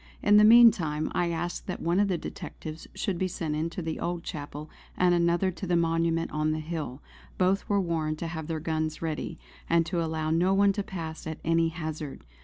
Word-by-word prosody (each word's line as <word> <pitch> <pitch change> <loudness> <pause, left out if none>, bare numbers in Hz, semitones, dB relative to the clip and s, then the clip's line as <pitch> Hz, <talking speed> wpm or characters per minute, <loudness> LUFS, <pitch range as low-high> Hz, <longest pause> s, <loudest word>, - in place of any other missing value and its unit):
In 205 0 +6
the 210 - +7
meantime 210 -10 +6
I 175 -1 +1
asked 170 +1 -3
that 185 - -4
one 170 +3 +1
of 205 - +3
the 185 -3 0
detectives 155 -1 -8
should 185 -4 -2
be 185 - +1
sent 160 -4 -3
into 165 +3 -3
the 160 0 -3
old 175 -1 -3
chapel 145 0 -6 0.3
and 180 -1 +4
another 175 +2 +2
to 185 +2 -7
the 175 - +2
monument 165 0 +1
on 155 0 0
the 155 - -2
hill. 155 -4 -5 0.3
Both 190 +2 +1
were 200 -1 +3
warned 160 -4 -1
to 165 - -4
have 160 -2 -5
their 160 -1 -2
guns 155 0 -2
ready, 160 -2 -3 0.3
and 170 -1 +4
to 170 0 -1
allow 160 -1 -2
no 180 +4 +3
one 200 0 +4
to 205 - -2
pass 165 -5 -6
at 160 - -4
any 165 0 +3
hazard. 155 -3 -6
165 Hz, 205 wpm, -28 LUFS, 155-180 Hz, 0.3 s, the